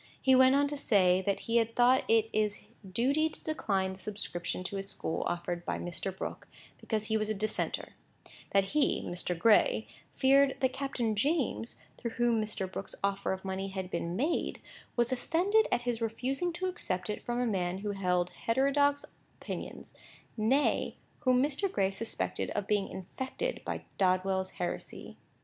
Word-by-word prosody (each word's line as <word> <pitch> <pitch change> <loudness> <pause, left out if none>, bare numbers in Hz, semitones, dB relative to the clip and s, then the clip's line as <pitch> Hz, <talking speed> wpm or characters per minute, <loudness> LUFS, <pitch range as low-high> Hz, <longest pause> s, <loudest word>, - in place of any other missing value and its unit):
He 265 - +4
went 260 +1 +7
on 285 +1 +4
to 290 - -3
say, 190 -8 +4
that 200 - +1
he 230 +1 +1
had 230 0 +1
thought 250 +2 +5
it 225 -1 +4
his 210 -1 +1 0.3
duty 275 +10 +2
to - - -11
decline 195 -11 0
the 190 - -12
subscription 185 -4 -4
to 195 +2 -4
his 195 0 -3
school 160 - -3
offered 175 0 -3
by - - -2
Mr. 175 +2 -4
Brooke, - - -5 0.3
because 215 -2 -2
he 220 0 +1
was 215 0 -1
a 215 - 0
Dissenter; 215 +2 -2 0.6
that 195 0 +4
he 300 -2 +2
(Mr. 175 0 -2
Gray) 230 - +4 0.3
feared 275 0 +4
that 260 -1 +1
Captain 265 -5 -1
James, 270 -1 0 0.2
through 235 -2 -4
whom 240 -2 +3
Mr. 210 -3 -1
Brooke's 195 - -6
offer 200 0 0
of 190 0 -4
money 190 0 -2
had 190 -1 -5
been 170 0 -2
made, 295 - 0 0.4
was 240 +1 +2
offended 360 - +2
at - - +2
his 240 -1 -2
refusing 260 +9 -1
to 360 +2 -3
accept 190 - -2
it 210 - -3
from 240 0 -2
a 250 - +1
man 185 -5 0
who 205 +1 -3
held 180 -3 0 0.2
heterodox 280 +4 +3 0.3
opinions; - - -7 0.4
nay, 245 +7 +2 0.2
whom 255 -2 +3
Mr. 305 +7 0
Gray 195 -1 +1
suspected 220 +3 -3
of 205 - -1
being 205 -1 +1
infected 260 - -4
by - - -4 0.2
Dodwell's 190 0 +1
heresy. 175 - -5
220 Hz, 170 wpm, -31 LUFS, 190-265 Hz, 0.6 s, went